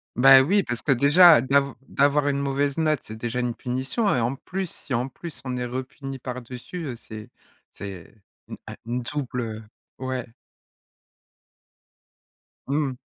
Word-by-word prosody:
Bah, 135 +1 +8
oui 195 +8 +3
parce 120 -5 -3
que 140 - +1
déjà 145 +3 +7
dav 140 +1 +2
d'avoir 145 +1 +2
une 140 -1 +1
mauvaise 140 0 0
note, 155 -3 +2
c'est 110 - -9
déjà 120 +2 -3
une 120 -1 -1
punition 130 - -1
et - - +1
en 120 +3 0
plus, 185 +6 -5
si 145 - -8
en 125 +3 -1
plus 165 +3 -9
on 125 -1 -3
est 125 - -2
re 125 +2 -3
puni 135 0 -8
par 125 -1 -6
dessus, 125 +8 -7
heu, 130 -4 -4
c'est 110 -2 -10 0.4
c'est 95 -2 -9 0.5
un - - -7
une 120 +2 -2
double, 125 -1 -3
heu 110 -1 -5 0.4
ouais. 130 -2 -3 2.4
Mmh 145 +2 +1
mh. 125 - -10
130 Hz, 165 wpm, -25 LUFS, 120-145 Hz, 2.4 s, Bah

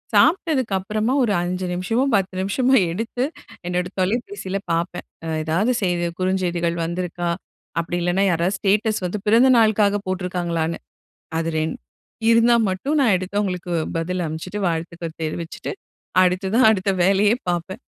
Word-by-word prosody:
சாப்ட்டதுக்கப்றமா 235 - +2
ஒரு 210 -4 +1
5 180 +1 -2
நிமிஷமோ, 225 +9 0
10 190 -1 0
நிமிஷமோ, 255 +7 +2 0.2
எடுத்து 230 +6 -2 0.4
என்னோட 180 0 -1
தொலைப்பேசில 205 - -2
பார்ப்பேன். 170 +2 -2 0.2
அ - - -4 0.2
ஏதாவது 190 +11 +1
செய்தி 175 -1 +1
குறுஞ்செய்திகள் 175 -2 0
வந்திருக்கா? 175 0 -3 0.5
அப்டி 175 +1 -3
இல்லன்னா 185 +3 +2
யாராவது 175 +4 0
ஸ்டேட்டஸ் 210 +1 +1 0.3
பிறந்த 240 +5 +6
நாளுக்காக 210 -2 +3
போட்ருக்காங்களான்னு. 175 -3 -2 0.6
அது 165 0 -1
2 155 0 -2 0.5
இருந்தா 230 +1 +5 0.2
மட்டும் 275 +12 -1
நான் 235 -7 +4
எடுத்து 185 +3 -3
அவங்களுக்கு 180 -3 -3 0.2
பதில் 175 +2 -1
அனுப்ச்சிட்டு 160 +6 -5
வாழ்த்துக்கள் 165 0 -4
தெரிவிச்சிட்டு 165 - -4 0.5
அடுத்ததா 190 +5 +1
அடுத்த 195 -2 +1
வேலையே 200 +3 +4
பார்ப்பேன். 175 +6 -2
185 Hz, 125 wpm, -22 LUFS, 175-215 Hz, 0.6 s, பிறந்த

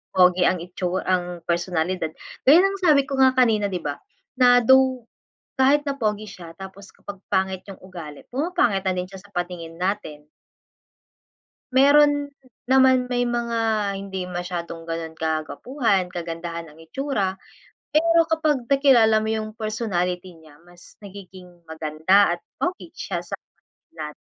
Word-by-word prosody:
pogi 180 0 +5
ang 180 - -1
itsu 180 0 -3
ang 180 -2 -2
personalidad. 175 -1 -1 0.4
Gaya 310 +6 +8
ng 390 0 -1
sabi 295 -6 +4
ko 275 -1 -3
nga 260 -1 +6
kanina, 220 -5 +3
di 185 - -1
ba? 145 -1 -3 0.4
Na 245 0 +7
though, 260 -2 +4 0.5
kahit 280 +3 +4
na 275 - -3
pogi 215 -2 -1
siya, 170 -4 -11
tapos 195 +1 -11
kapag 205 -1 -10 0.2
pangit 190 -1 0
yong 195 - -11
ugali, 170 -6 -9
pumapangit 265 - 0
na 190 - +1
din 180 0 -3
siya 195 - -10
sa 200 +1 -21
paningin 175 -2 -5
natin. 170 -6 -3 1.4
Meron 290 +2 +5 0.4
naman 260 -1 +4
may 245 0 0
mga 235 -1 -2 0.4
hindi 190 -2 -5
masyadong 175 -2 -5
ganon 165 -1 -5
kagwapuhan, 185 - -1
kagandahan 170 -1 -5
ang 150 - -18
itsura. 195 - -2 0.6
Pero 335 +2 +4
kapag 310 -5 0
nakilala 255 -6 +5
mo 220 0 -3
yung 220 -1 -2
personality 190 -5 -3
niya, 155 -2 -18
mas 175 0 -18
nagiging 185 -3 -12
maganda 160 +4 +2
at - - -17 0.2
pogi 355 -1 -3
siya - - -4
sa - - -6 0.6
lat 155 - -3
195 Hz, 140 wpm, -23 LUFS, 175-255 Hz, 1.4 s, Gaya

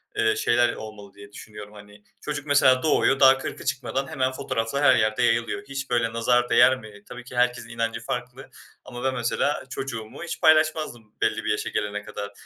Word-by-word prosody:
eee, 110 -1 +2
şeyler 120 +2 +2
olmalı 105 -2 -10
diye 100 0 -14
düşünüyorum. 105 0 -11
Hani, 105 0 -15 0.2
çocuk 145 -1 -5
mesela 135 -3 +4
doğuyor 135 -3 +2
daha 135 0 +7
40'ı - - -7
çıkmadan 135 +1 -2
hemen 130 -1 -1
fotoğraflar 130 0 -3
her 130 -2 +6
yerde 110 -1 +1
yayılıyor. 115 +3 0
Hiç 135 -1 -5
böyle 120 -2 0
nazar 120 +1 +1
değer 130 0 +5
mi? 105 -2 -14
Tabii 125 0 -9
ki 125 0 -12
herkesin 125 -1 0
inancı 115 -1 -3
farklı 125 +2 -6 0.4
ama 120 -1 -8
ben 130 0 0
mesela 120 +4 -1
çocuğumu 130 0 -6
hiç 175 - -6
paylaşmazdım 155 -8 +2
belli - - 0
bir - - +1
yaşa - - -2
gelene 105 0 -3
kadar 100 -1 -7
120 Hz, 185 wpm, -24 LUFS, 110-135 Hz, 0.4 s, daha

